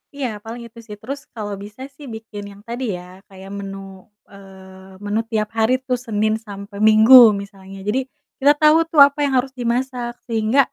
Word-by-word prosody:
Iya, 275 Hz, -2 st, -2 dB, 0.2 s
paling 230 Hz, +2 st, -8 dB
itu 230 Hz, +1 st, -16 dB
sih, 210 Hz, -, -8 dB
terus 275 Hz, +5 st, -6 dB, 0.2 s
kalau 210 Hz, -2 st, -5 dB
bisa 210 Hz, +4 st, -12 dB
sih 290 Hz, -, -12 dB
bikin 220 Hz, -2 st, -9 dB
yang 200 Hz, 0 st, -15 dB
tadi 240 Hz, +3 st, -5 dB
ya, 175 Hz, -, -11 dB, 0.2 s
kayak 190 Hz, 0 st, -13 dB
menu, 195 Hz, 0 st, -7 dB, 0.5 s
eee, 190 Hz, -1 st, -15 dB
menu 210 Hz, +2 st, -1 dB
tiap 215 Hz, -1 st, -1 dB
hari 220 Hz, +3 st, +3 dB
tuh, 250 Hz, -1 st, 0 dB
Senin 215 Hz, -1 st, 0 dB
sampai 200 Hz, 0 st, -9 dB
Minggu 220 Hz, +4 st, +7 dB, 0.3 s
misalnya, 195 Hz, -1 st, -12 dB
jadi 235 Hz, +5 st, +1 dB, 0.4 s
kita 285 Hz, +1 st, +5 dB
tau 305 Hz, +1 st, +6 dB
tuh 310 Hz, -, +2 dB
apa 285 Hz, +1 st, -11 dB
yang 275 Hz, -, -1 dB
harus 260 Hz, +1 st, -1 dB
dimasak 245 Hz, 0 st, -2 dB
sehingga 225 Hz, +3 st, +1 dB
220 Hz, 180 wpm, -20 LUFS, 200-250 Hz, 0.5 s, Minggu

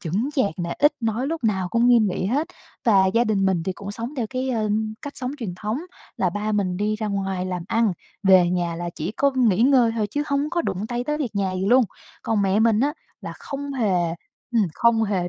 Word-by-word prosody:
chững 200 Hz, -, -1 dB
chạc 230 Hz, -, +1 dB
nè, 170 Hz, -1 st, -3 dB
ít 295 Hz, +1 st, +5 dB
nói, 230 Hz, +3 st, -1 dB
lúc 320 Hz, -5 st, -3 dB
nào 190 Hz, -4 st, +1 dB
cũng 235 Hz, +5 st, +2 dB
nghiêm 230 Hz, -4 st, +5 dB
nghị 185 Hz, +1 st, -2 dB
hết. 285 Hz, -, 0 dB, 0.4 s
Và 195 Hz, -4 st, +5 dB
gia 230 Hz, +5 st, +2 dB
đình 200 Hz, -3 st, +1 dB
mình 180 Hz, -4 st, +1 dB
thì 190 Hz, -, -2 dB
cũng 200 Hz, +2 st, -8 dB
sống 235 Hz, +7 st, -6 dB
theo 235 Hz, -3 st, -1 dB
cái, 260 Hz, 0 st, -2 dB
ờ, 220 Hz, -3 st, 0 dB, 0.3 s
cách 285 Hz, -, -7 dB
sống 255 Hz, 0 st, -3 dB
truyền 200 Hz, -8 st, -4 dB
thống 215 Hz, +6 st, -3 dB, 0.4 s
là 180 Hz, -2 st, +1 dB
ba 210 Hz, +3 st, -2 dB
mình 185 Hz, -3 st, 0 dB
đi 210 Hz, +2 st, 0 dB
ra 215 Hz, -1 st, -3 dB
ngoài 195 Hz, -2 st, -2 dB
làm 180 Hz, -2 st, -3 dB
ăn, 225 Hz, -3 st, +2 dB, 0.3 s
về 185 Hz, -3 st, +6 dB
nhà 175 Hz, -2 st, -1 dB
là 175 Hz, 0 st, -4 dB
chỉ 170 Hz, +6 st, -4 dB
có 280 Hz, +4 st, +2 dB
nghỉ 230 Hz, -4 st, +3 dB
ngơi 250 Hz, -4 st, +4 dB
thôi 215 Hz, -2 st, +1 dB
chứ 290 Hz, -, -1 dB
hông 285 Hz, +1 st, 0 dB
có 345 Hz, -1 st, 0 dB
đụng 195 Hz, +4 st, -3 dB
tay 240 Hz, 0 st, -2 dB
tới 300 Hz, +3 st, -1 dB
việc 250 Hz, -8 st, -3 dB
nhà 195 Hz, -2 st, 0 dB
gì 185 Hz, +1 st, -2 dB
luôn. 250 Hz, +2 st, +5 dB, 0.4 s
Còn 215 Hz, -3 st, +1 dB
mẹ 195 Hz, +2 st, +2 dB
mình 225 Hz, -1 st, +3 dB
á 290 Hz, +2 st, +2 dB, 0.3 s
là -, -, -6 dB
không 280 Hz, 0 st, -6 dB
hề 235 Hz, -7 st, 0 dB, 0.6 s
ừm, 220 Hz, -5 st, +4 dB
không 235 Hz, -1 st, +3 dB
hề 190 Hz, -4 st, -1 dB
215 Hz, 240 wpm, -23 LUFS, 190-250 Hz, 0.6 s, về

